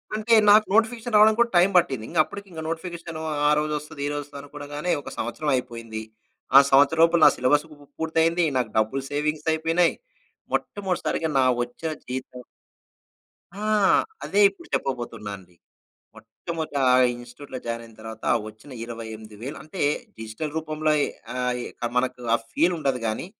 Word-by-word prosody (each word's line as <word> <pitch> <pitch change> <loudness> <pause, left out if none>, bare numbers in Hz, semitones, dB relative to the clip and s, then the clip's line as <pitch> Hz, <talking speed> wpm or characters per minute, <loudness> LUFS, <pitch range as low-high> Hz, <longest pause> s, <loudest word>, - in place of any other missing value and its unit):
అంటే 220 +2 +1 0.2
నాకు 215 +1 +7
notification 225 0 +1
రావడానిక్కూడా 220 +3 +5
time 185 +3 +5
పట్టింది. 130 -10 +1
ఇంకప్పడికింక 170 +1 -2
నోటిఫికేషను 165 -1 -5 0.3
ఆ - - +5
రోజొస్తది. 150 -1 -4
ఈరోజొవస్తదనుకోగానే 145 +2 -5
ఒక - - -8
సంవత్సరం 135 +6 -3
అయిపోయింది. 115 -3 -5 0.6
ఆ - - +13
సంవత్సరం 145 +4 +5
లోపు 170 +1 +4
నా - - +10
సిలబస్ 145 +5 +2
పు - - -12 0.2
పూర్తయింది. 165 +1 +2
నాకు 125 -4 0
డబ్బులు 110 +5 +1
సేవింగ్స్ 150 +2 -2
అయిపోయినాయి. 165 +2 +2 0.6
మొట్టమొదటి 190 -3 -2
సారిగా 160 -1 0
నా - - +5 0.2
వచ్చేన 140 +7 -5 0.2
జీతం 125 0 -6 1.2
ఆ! - - -4 0.6
అదే 205 - +2
ఇప్పుడు 195 - -16
చెప్పబోతున్నానండి. 105 -8 -5 0.6
మొట్టమొదట 160 +7 -6 0.4
ఇన్‌స్ట్‌ట్యూట్‌లో 120 +3 -9
జాయినయిన 115 -1 -5
తర్వాత 110 0 -9 0.2
వచ్చిన 110 +6 -14
28 110 -2 -8
వేలు 135 +4 -5
అంటే 155 +5 -8 0.4
డిజిటల్ 110 +8 -5
రూపంలోయి 155 -1 +1 0.3
అయి 125 -1 -1 0.3
మనకు 125 0 0
ఆ - - +6 0.2
ఫీలుండదు 155 -7 +1
గానీ, 110 +9 -2
145 Hz, 125 wpm, -24 LUFS, 120-165 Hz, 1.2 s, ఆ